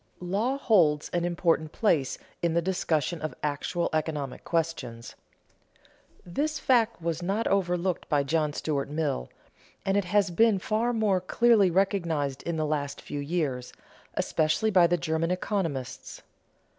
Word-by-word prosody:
_ - - -38 0.2
Law 205 +9 -1
holds 170 - +3
an 175 -1 -1
important 170 -3 +1
place 155 - +1 0.2
in 170 -1 +1
the 170 - +3
discussion 170 -3 -1
of 155 - -4
actual 150 +4 -1
economic 150 -4 -2
questions. 145 -9 -3 1.1
This 295 - -1
fact 235 -3 +2
was 165 0 -1
not 195 +6 -1
overlooked 180 -2 0
by 145 -2 +2
John 155 +1 0
Stuart 145 -2 -2
Mill, 145 - -2 0.6
and 195 - +1
it 200 -2 +2
has 200 0 +2
been 220 +4 +4
far 220 +5 0
more 210 -5 +1
clearly 220 0 +4
recognized 170 -7 0
in 170 - -3
the 155 - 0
last 145 -2 -2
few 145 - -6
years, 140 -5 -2 0.4
especially 160 +8 +1
by 180 -3 +6
the 175 +1 +1
German 160 +1 -1
economists. 170 - -3
170 Hz, 145 wpm, -27 LUFS, 150-195 Hz, 1.1 s, by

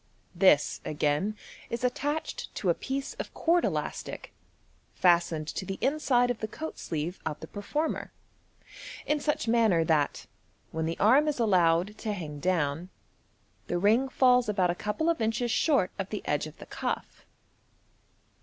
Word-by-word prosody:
This - - +4
again 155 +8 0 0.3
is 235 +1 -4
attached 290 +5 -2
to 185 - +1
a - - +3
piece 270 +8 -4
of - - -5
cord 340 +1 +2
elastic, - - -3 0.6
fas 175 -1 +5
tened 155 -1 -5
to - - -3
the 190 +1 -5
inside 260 -4 +2
of 245 - -4
the 220 - -3
coat 315 +8 -7
sleeve 165 +3 -4
of 155 -1 -4
the - - -7
performer, 295 +10 -3 0.9
in 300 0 +1
such 290 -6 -1
manner 225 -8 +4
that, 155 -3 +1 0.5
when 160 0 -2
the 165 - -3
arm 265 +9 +5
is 300 - 0
allowed 185 -2 +2
to 215 - -2
hang 155 -6 -6
down, 165 0 0 0.8
the 175 - -1
ring 220 +8 +3
falls 250 -3 +4
about 185 -4 +2
a 175 - -7
couple 210 +10 -1
of 335 -6 +1
inches 225 +2 0
short 275 - +2
of 195 -1 -3
the 210 - -4
edge 150 +1 0
of 155 - -13
the - - -10
cuff. - - -4
210 Hz, 160 wpm, -28 LUFS, 170-250 Hz, 0.9 s, fas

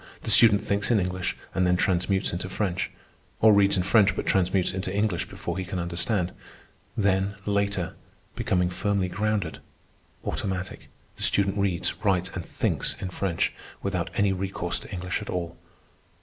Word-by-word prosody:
The - - +1
student 105 -1 +7
thinks 100 +1 -1
in 115 -3 +4
English 90 -1 -2 0.2
and 90 -1 +2
then 90 0 +3
transmutes 95 +1 +1
into 90 +2 -3
French, 95 -2 -1 0.5
or 110 -1 +7
reads 100 -1 +4
in 90 - +1
French 100 -1 +4
but - - -3
transmutes 95 -1 +2
into 95 0 -3
English 100 -3 0
before - - -4
he - - -2
can 90 +1 -5
understand. 90 +2 -1 0.7
Then 100 -1 +1
later, 100 -3 0 0.4
becoming 90 -1 +1
firmly 95 0 0
grounded, 105 -4 -1 0.7
automatic, 95 -1 -3 0.3
the - - -9
student 100 -1 +4
reads, 100 -4 0
writes, 95 -2 +2
and 90 - -4
thinks - - -1
in 90 - -4
French, 90 -3 -1 0.3
without 90 -4 -1
any 100 -1 +3
recourse 95 +1 -3
to - - -12
English 90 -1 -3
at - - -8
all. 85 -1 -3
95 Hz, 160 wpm, -26 LUFS, 90-100 Hz, 0.7 s, student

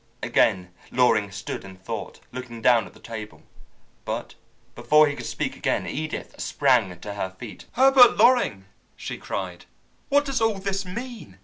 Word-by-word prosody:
Again 90 -1 +2 0.2
Loring 115 -5 +3
stood 100 +2 -6
in 95 -1 -11
thought, 95 - -7
looking 125 -2 -7
down 115 -3 +4
at - - -16
the - - -16
table. 110 -2 -8 0.6
But - - -4 0.4
before 150 0 +5
he 145 -1 -2
could 120 -3 -6
speak 115 - -3
again, - - -1
Edith 155 +1 -5
sprang 115 -11 +2
to 105 - -6
her 100 -2 -3
feet. 100 +4 -11
"Herbert 265 -1 +7
Loring," 240 - +4 0.3
she - - -6
cried, 90 -3 -5 0.4
"what 285 +1 +3
does 270 -4 -1
all 225 -2 +2
this 195 0 -3
mean? 215 - -7
125 Hz, 155 wpm, -24 LUFS, -, 0.6 s, Herbert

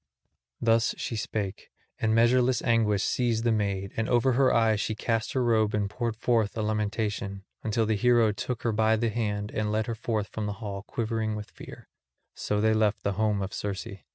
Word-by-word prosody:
Thus 115 -1 +2
she 115 - -3
spake, 105 -2 -4 0.3
and 110 -1 +1
measureless 125 +2 +3
anguish 110 -4 +2
seized 115 -3 0
the 120 - +2
maid; 100 -3 -1
and 110 -1 -1
over 120 +2 +3
her 130 +1 +3
eyes 110 -2 +3
she 110 - -2
cast 115 0 -1
her 130 - +1
robe 110 -3 +2
and 105 -1 0
poured 115 +2 -3
forth 115 -2 +1
a 110 - 0
lamentation, 105 -2 -2 0.2
until 110 +1 0
the 110 - +1
hero 120 0 +4
took 115 +4 -4
her 115 - +1
by 110 +1 +3
the 115 +1 0
hand 105 -2 -2
and 105 -1 -1
led 110 0 0
her 115 - -3
forth 110 -2 -2
from 110 -1 -4
the 105 - -2
hall 100 -3 -5
quivering 110 0 -2
with 105 -1 -7
fear. - - -12 0.5
So 105 - -2
they 110 +1 +3
left 110 -1 +1
the 100 - 0
home 105 0 0
of 95 - -5
Circe. 100 -2 -3
110 Hz, 200 wpm, -27 LUFS, 105-115 Hz, 0.5 s, hero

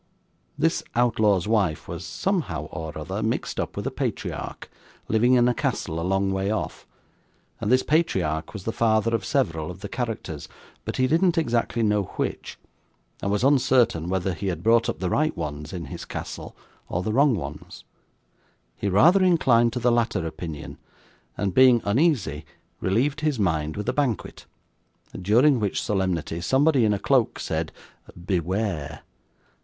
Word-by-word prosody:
This - - +1
outlaw's 110 -6 +2
wife 100 -8 +1
was, 85 +1 -6
somehow 145 - -2
or 80 -1 -6
other, 75 - -4
mixed - - -2
up - - -3
with - - -3
a - - -1
patriarch, - - -4 0.4
living 120 +4 +3
in 120 -1 +4
a 125 - +3
castle 80 -7 -2
a - - -3
long 95 +2 +1
way 95 +1 -1
off, 110 0 -3 0.7
and 105 - -1
this 130 0 +4
patriarch 90 - 0
was 105 -4 -8
the 115 - -2
father 115 0 +2
of 115 -4 0
several 80 -4 0
of 90 +1 -9
the 105 - -5
characters, 110 - -4 0.4
but - - -4
he 130 - +3
didn't 170 +5 +2
exactly 120 -5 0
know 105 -1 +2
which, - - -3 0.6
and 100 - -1
was 105 +3 0
uncertain 125 - +3
whether 95 0 0
he 100 +4 -4
had 85 -3 -3
brought 115 +1 +4
up - - -2
the 90 - -2
right 155 +1 +1
ones 75 -2 -5
in 85 -3 -5
his - - -7
castle, - - -7 0.3
or 90 - -2
the 110 - -2
wrong 140 0 +4
ones; 75 -4 -7 0.9
he 100 - -2
rather 170 - +5
inclined 125 -10 +4
to 125 - -3
the 120 0 +2
latter 115 -7 +1
opinion, 80 -2 -7 0.6
and, 100 -2 -1
being 130 0 +6
uneasy, 105 - +1 0.4
relieved 135 +10 0
his 150 -4 0
mind 80 -6 0
with 105 - -4
a - - +1
banquet, 135 -8 -2 0.7
during 120 +8 +4
which 105 -3 -1
solemnity 90 -4 -1
somebody 135 - +3
in 105 - +3
a - - -1
cloak 125 +2 +2
said - - -3 0.5
'Beware! 90 -5 -2
105 Hz, 160 wpm, -25 LUFS, 90-125 Hz, 0.9 s, being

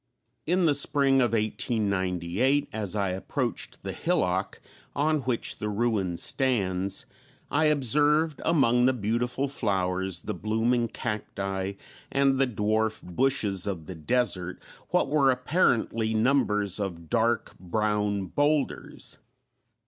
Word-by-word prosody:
In 180 +2 +2
the 155 - +4
spring 140 -1 +3
of 120 -2 +1
1898, 105 +3 0
as 105 -2 -2
I 100 -2 0
approached 95 +1 -4
the - - -3
hillock 90 +1 -1 0.4
on 155 +2 +2
which 125 -3 -2
the 105 - -3
ruin 105 -5 0
stands, 100 -8 0 0.5
I 145 +3 +3
observed, 150 +2 +2
among 125 -7 +3
the 130 - +4
beautiful 125 +4 -1
flowers, 95 -7 -1
the 105 - -4
blooming 115 +5 0
cacti, 100 -4 -4 0.4
and 135 -1 +2
the 135 - +4
dwarf 110 0 0
bushes 100 -1 +1
of 90 -6 -4
the 95 - -7
desert, 95 0 -1 0.3
what - - +2
were 140 -2 +3
apparently 125 -5 +1
numbers 110 -5 +1
of 85 -5 -4
dark 115 +4 0
brown 105 +1 -1
boulders. 145 - -1
110 Hz, 120 wpm, -27 LUFS, 95-135 Hz, 0.5 s, the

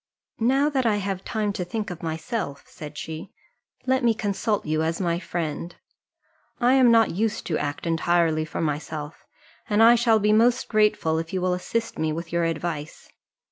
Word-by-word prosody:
"Now 265 +5 +3
that 260 -4 +1
I 215 - +3
have 195 -2 -3
time 210 -2 -1
to 185 - -3
think 210 +3 -4
of 175 - -8
myself," 160 - -4
said 150 -1 -10
she, 160 +1 -6 0.5
"let 260 0 +1
me 230 -2 +3
consult 210 0 -1
you 155 0 0
as 165 +1 -1
my 170 -2 0
friend: 170 -1 -4 0.8
I 245 0 +4
am 260 -2 +6
not 230 -2 +5
used 215 +4 -1
to 160 - -1
act 145 +3 -4
entirely 165 -1 +2
for 155 - -5
myself, 150 0 -4 0.4
and 210 +1 +4
I 230 +1 +8
shall 235 -2 +4
be 210 0 +2
most 235 +3 +3
grateful 210 -7 +2
if 165 +2 -6
you 190 - 0
will 180 0 +1
assist 225 +5 -3
me 160 0 0
with 165 +1 -5
your 170 0 +2
advice. 160 -2 -4
180 Hz, 180 wpm, -24 LUFS, 160-225 Hz, 0.8 s, I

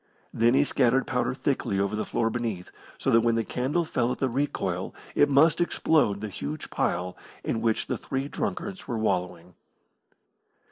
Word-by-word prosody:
Thin 120 +2 +4
he - - +5
scattered 130 -2 +2
powder 125 0 -1
thickly 120 -8 -1
over 100 +2 0
the 110 - -2
floor 115 -1 0
beneath, 110 -7 -3 0.3
so - - 0
that 115 - +6
when 115 0 +2
the 115 - +1
candle 140 +10 -1
fell 125 -5 0
at - - -3
the 135 - 0
recoil 140 +4 -2 0.2
it 145 - +4
must 155 +5 +5
explode 150 -11 +2
the 105 - -3
huge 75 -6 -6
pile 90 +1 -1 0.3
in 115 - -1
which 115 -1 +1
the - - -3
three 135 +1 -3
drunkards 195 +6 -4
were 120 - -2
wallowing. 90 -4 -2
120 Hz, 175 wpm, -27 LUFS, 105-135 Hz, 0.3 s, that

